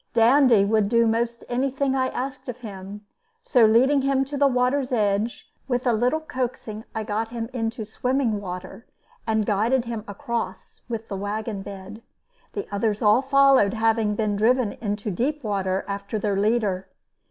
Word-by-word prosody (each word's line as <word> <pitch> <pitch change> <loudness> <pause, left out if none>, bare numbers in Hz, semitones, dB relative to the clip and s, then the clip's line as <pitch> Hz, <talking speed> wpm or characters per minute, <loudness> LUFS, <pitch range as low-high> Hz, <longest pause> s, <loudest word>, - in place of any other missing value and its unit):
Dandy 235 -2 +5
would 210 -1 +2
do 235 +1 +4
almost 230 +1 0
anything 270 +2 0
I 260 -1 +1
asked 260 +1 -5
of 250 +1 -7
him; 205 -1 -8 0.4
so, 250 - +5
leading 260 +6 +4
him 270 0 +1
to 285 +2 -6
the 280 0 +4
water's 255 +1 +1
edge, 210 -1 0 0.2
with 250 -1 -1
a 240 - +3
little 250 +8 +1
coaxing 245 -6 -4
I 220 - -2
got 215 +1 -2
him 230 0 -5
into 225 -2 -3
swimming 240 -1 -1
water 185 +4 -8 0.4
and 220 -1 +1
guided 230 +5 +1
him 230 -2 -4
across 205 -3 -5
with 225 -1 -4
the 200 - -5
wagon 205 +1 -3
bed. 200 +2 -9 0.5
The 405 - -4
others 210 +1 -1
all 215 +4 +5
followed, 275 -6 +4
having 220 -1 +1
been 210 -1 0
driven 230 +1 +2
into 205 -1 -4
deep 280 - -2
water 195 -3 -1
after 200 +2 -4
the 205 -1 -1
leader. 200 -2 0
225 Hz, 165 wpm, -24 LUFS, 205-255 Hz, 0.5 s, Dandy